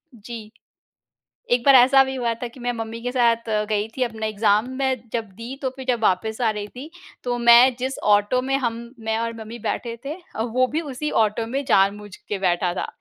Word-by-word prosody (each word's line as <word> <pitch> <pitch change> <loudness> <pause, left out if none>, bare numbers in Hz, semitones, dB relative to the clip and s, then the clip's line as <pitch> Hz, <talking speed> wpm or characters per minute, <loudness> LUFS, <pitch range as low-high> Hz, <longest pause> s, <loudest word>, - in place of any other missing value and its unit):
जी। 220 0 -9 1.0
एक 245 - 0
बार 275 - +7
ऐसा 265 +2 +7
भी 265 0 -4
हुआ 240 -3 -1
था 240 +2 -6
कि 250 - -15
मैं 245 0 -1
मम्मी 225 0 -6
के 245 - -2
साथ 235 -2 +2
अ, 210 -1 +1
गई 210 0 -1
थी 260 - -1
अपना 225 -3 -2
एग्ज़ाम 215 +1 +2
में 265 -3 0
जब 230 -2 -1
दी 230 +5 -7
तो 260 - 0
फिर 265 - -7
जब 240 -2 +1
वापस 220 +4 0
आ 230 -2 +3
रही 210 -1 -4
थी 265 +8 -10 0.3
तो 245 -1 -1
मैं 240 +2 +7
जिस 260 +2 -3 0.2
ऑटो 205 +5 +2
में 270 +1 0
हम, 235 -1 -4
मैं 220 0 -1
और 230 0 -2
मम्मी 220 +2 -8
बैठे 230 +2 -3
थे 285 +2 -4 0.3
वो 250 +2 +1
भी 315 - +1
उसी 300 +4 -3
ऑटो 215 +2 -2
में 270 +4 -3
जानबूझ 205 -3 +1
के 205 - -5
बैठा 180 -1 +1
था। - - -3
235 Hz, 215 wpm, -23 LUFS, 215-255 Hz, 1.0 s, बार